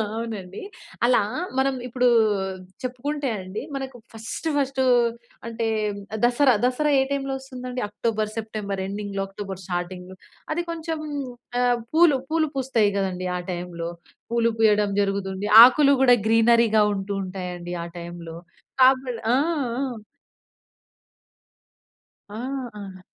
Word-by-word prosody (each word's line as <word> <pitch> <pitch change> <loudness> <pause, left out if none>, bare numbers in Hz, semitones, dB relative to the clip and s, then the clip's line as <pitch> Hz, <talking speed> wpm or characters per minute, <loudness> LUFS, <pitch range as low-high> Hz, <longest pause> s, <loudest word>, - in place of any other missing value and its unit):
అవునండి. 215 -5 -5 0.4
అలా 245 -2 +4 0.4
మనం 270 +1 +2
ఇప్పుడు 250 0 +1 0.8
చెప్పుకుంటే 270 +3 -3
అండి. 185 +3 -6
మనకు 265 -2 -5 0.2
ఫస్ట్ 225 +8 -5
ఫస్ట్ 275 -1 0 0.7
అంటే 230 0 -2 0.6
'దసరా', 245 +1 +4
దసరా 290 +4 +1
ఏ - - +4
టైమ్‌లో 275 -1 -1
వస్తుందండి 255 -2 -6
అక్టోబర్, 215 0 -2
సెప్టెంబర్ 210 -3 -4
ఎండింగ్‌లో 200 0 -4
అక్టోబర్ 195 -1 -7
స్టార్టింగ్‌లో. 180 +1 -5 0.4
అది 345 +2 -1
కొంచెం 325 -1 -4 0.6
ఆహ్, 245 -1 +3 0.2
పూలు 320 -3 +5
పూలు 320 -1 +2
పూస్తాయి 250 -6 +2
కదండీ 185 -2 -2
ఆ - - -3
టైమ్‌లో. 175 -1 -5 0.4
పూలు 235 0 +2
పూయడం 210 -2 +4
జరుగుతుంది. 195 0 -2 0.2
ఆకులు 280 +3 +6
కూడా 250 -2 +7
గ్రీనరీగా 225 -1 +4
ఉంటూ 195 +1 -4
ఉంటాయి 185 -1 -5
అండి. 175 0 -7
ఆ - - -5
టైమ్‌లో. 170 -1 -8 0.4
కాబల్ 255 -2 +4 0.2
ఆ! - - +4 0.4
ఆ! 245 -6 -4 2.3
ఆ! 205 - -9 0.4
ఆ! 190 -2 -10
225 Hz, 115 wpm, -24 LUFS, 195-260 Hz, 2.3 s, కూడా